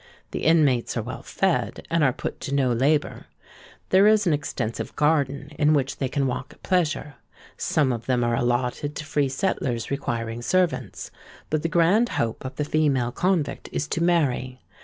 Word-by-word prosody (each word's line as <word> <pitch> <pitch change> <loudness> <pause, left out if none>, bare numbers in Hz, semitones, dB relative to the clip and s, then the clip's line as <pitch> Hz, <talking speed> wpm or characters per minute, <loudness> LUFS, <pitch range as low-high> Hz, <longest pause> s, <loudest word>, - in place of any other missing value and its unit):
The - - -4
inmates 145 -8 +3
are 115 - -1
well 130 +4 -6
fed, 190 -3 -1
and 165 -2 +3
are 135 - +4
put - - -5
to 140 - -3
no 130 -3 +2
labour. 145 +5 0 0.6
There 195 +2 +6
is 215 -1 +4
an 170 - +3
extensive 125 -6 -3
garden, 145 -2 +1
in 150 +1 +4
which 135 -2 -1
they 135 - -2
can 140 +1 0
walk 130 +1 -3
at - - -26
pleasure. 155 -6 0 0.4
Some 145 -4 +1
of 115 -1 -6
them 125 -2 +2
are 120 0 +1
allotted 125 +4 -1
to 155 - -5
free 145 -2 0
settlers 130 -6 -2
requiring 120 -4 -3
servants; 180 +5 -1 0.4
but 155 -1 +1
the 165 - -1
grand 185 +7 +3
hope 115 -1 -1
of 130 - -6
the 150 - -2
female 140 -6 +1
convict 180 0 -1
is 145 - -2
to 165 - -1
marry. 135 -7 +1
145 Hz, 180 wpm, -24 LUFS, 125-160 Hz, 0.6 s, There